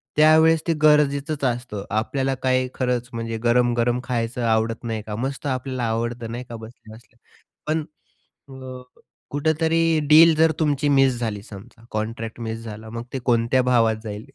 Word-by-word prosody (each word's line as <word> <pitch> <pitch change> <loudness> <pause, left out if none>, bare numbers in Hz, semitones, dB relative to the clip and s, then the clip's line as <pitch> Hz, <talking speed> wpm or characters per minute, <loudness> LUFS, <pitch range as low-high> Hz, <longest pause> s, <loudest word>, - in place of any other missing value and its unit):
त्यावेळेस 160 +1 +5
ते 165 - +3
गरजेचंच 150 -1 +2
असतं. 120 -5 -3
आपल्याला 130 +5 -1
काही 130 0 +2
खरंच 125 -2 -1
म्हणजे 115 -1 -4
गरम-गरम 120 0 +2
खायचं 120 -1 -2
आवडत 110 0 0
नाही 115 -2 -3
का, 105 0 -6
मस्त 135 +5 -4
आपल्याला 130 -1 -3
आवडतं 115 0 -2
नाही 120 +2 -5
का, 120 - -7
बसल्या-बसल्या. 110 0 -13 0.5
पण 155 +1 0 0.7
अ, 130 -1 -9 0.5
कुठेतरी 160 +2 +1
डील 160 +1 +8
जर 160 +1 +4
तुमची 145 -2 +1
मिस 135 -3 +3
झाली, 110 -4 -3
समजा 110 +3 -13
कॉन्ट्रॅक्ट 110 +1 -4
मिस 115 0 -4
झाला, 110 0 -9
मग 115 +1 -6
ते 135 - -2
कोणत्या 120 +1 +2
भावात 115 -2 +3
जाईल? 105 0 -6
120 Hz, 150 wpm, -22 LUFS, 115-140 Hz, 0.7 s, डील